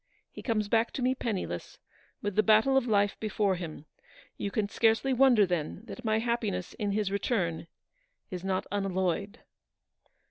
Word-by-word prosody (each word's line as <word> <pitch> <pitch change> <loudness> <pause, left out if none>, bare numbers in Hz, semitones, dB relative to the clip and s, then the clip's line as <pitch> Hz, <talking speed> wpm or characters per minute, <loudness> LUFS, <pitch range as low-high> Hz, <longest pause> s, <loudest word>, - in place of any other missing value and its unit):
He - - -9
comes 215 -4 0
back 225 +2 +2
to 260 - -3
me 255 +1 +3
penniless, 225 -7 -4 0.5
with 205 -2 -2
the 215 - +5
battle 220 +5 +4
of 265 -2 +3
life 205 -2 +2
before 210 -2 +1
him. 165 -4 -6 0.5
You 200 - -3
can 205 0 -1
scarcely 225 +5 +2
wonder, 250 -5 +5
then, 175 0 -2
that 250 - -9
my 220 -1 +2
happiness 225 -5 -1
in 205 -1 -2
his 205 -2 0
return 180 -6 -1 0.6
is 180 -1 -5
not 190 -1 -1
unalloyed." 195 +1 -1
210 Hz, 155 wpm, -29 LUFS, 190-230 Hz, 0.6 s, the